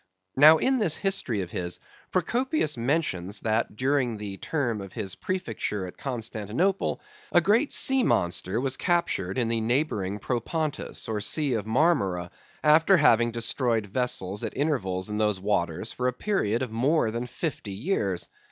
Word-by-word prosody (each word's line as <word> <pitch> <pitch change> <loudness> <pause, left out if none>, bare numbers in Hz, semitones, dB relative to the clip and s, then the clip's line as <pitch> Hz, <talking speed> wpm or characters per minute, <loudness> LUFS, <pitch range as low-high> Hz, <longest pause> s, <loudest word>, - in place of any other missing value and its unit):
Now, 155 +4 +8
in 260 +8 +1
this 175 -8 +2
history 165 - -1
of 90 -2 -6
his, 90 -1 -3 0.3
Procopius 230 - 0
mentions 115 - -1
that, 110 -1 0
during 130 -2 0
the 100 -2 -6
term 120 -8 -2
of 95 -2 -9
his 95 -2 -3
prefecture 115 - -3
at 90 - -9
Constantinople, 125 - -2 0.3
a - - +6
great 215 - +2
sea 265 0 +5
monster 95 - 0
was 135 0 0
captured 170 - 0
in 120 -3 +1
the 115 0 0
neighboring 110 -5 0
Propontis, 145 - -3
or 110 -2 -2
Sea 145 +5 +1
of 110 -2 -2
Marmora, 100 - +1 0.3
after 160 +5 +5
having 120 -7 +4
destroyed 115 -1 +1
vessels 105 -3 -1
at - - -5
intervals 100 -11 -1
in 105 0 -3
those 105 -3 +1
waters 95 0 -1
for 125 - -2
a 125 - 0
period 125 - -1
of 125 - -5
more 125 +1 +1
than 120 +2 -4
fifty 125 - -5
years. 100 - -1
120 Hz, 155 wpm, -26 LUFS, 105-155 Hz, 0.3 s, Now